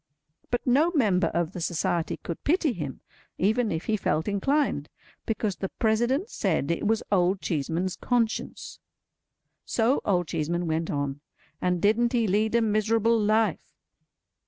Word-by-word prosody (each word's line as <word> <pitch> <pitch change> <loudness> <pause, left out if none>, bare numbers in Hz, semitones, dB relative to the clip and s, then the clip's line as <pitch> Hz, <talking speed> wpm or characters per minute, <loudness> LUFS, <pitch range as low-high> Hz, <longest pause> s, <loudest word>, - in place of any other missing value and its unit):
But 245 - -1
no 280 +6 +4
member 195 - +3
of 170 0 -1
the 180 - -6
Society 170 0 -1
could 170 - -7
pity 320 -3 +2
him, 150 - -6 0.4
even 220 +4 +1
if 160 0 -3
he 220 - +1
felt 160 -5 -1
inclined, 205 - 0 0.4
because 215 -3 -1
the 195 - -3
President 240 - +1
said 170 - -1
it 170 - -1
was 225 0 +1
Old 185 0 +3
Cheeseman's 170 +4 -2
conscience. 235 -3 -2 0.8
So 235 +4 +1
Old 180 -4 +1
Cheeseman 170 +4 -1
went 160 0 -1
on, 145 -4 -2 0.4
and 180 -1 +1
didn't 230 +5 +2
he 235 -2 +2
lead 215 +3 +1
a 235 - +4
miserable 220 +1 +2
life! 215 +1 +1
205 Hz, 145 wpm, -26 LUFS, 170-230 Hz, 0.8 s, no